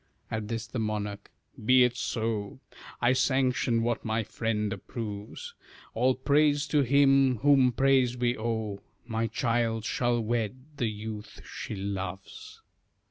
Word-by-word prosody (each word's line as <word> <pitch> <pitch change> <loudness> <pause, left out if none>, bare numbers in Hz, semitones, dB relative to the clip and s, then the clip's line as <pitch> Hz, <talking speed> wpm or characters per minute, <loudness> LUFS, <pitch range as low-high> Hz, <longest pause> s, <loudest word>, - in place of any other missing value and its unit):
At 110 -1 -3
this, 115 +1 -3
the 110 +3 -5
monarch 105 -2 -3 0.3
"Be 130 +3 +6
it 125 -1 +2
so! 110 -2 -2 0.4
I 120 +1 +4
sanction 130 -3 +2
what 120 0 -1
my 110 0 0
friend 105 -1 -2
approves; 105 -1 -7 0.4
All 125 +3 +2
praise 145 +2 +2
to 150 - +3
Him, 135 -1 +4
whom 135 -3 +5
praise 130 -1 +3
we 120 0 +1
owe; 110 -3 -3 0.3
My 115 -1 -1
child 115 0 0
shall 120 -1 +1
wed 115 0 -1 0.2
the 120 -4 0
youth 105 0 -7
she - - -6
loves." 95 -1 -6
115 Hz, 135 wpm, -28 LUFS, 110-130 Hz, 0.4 s, Be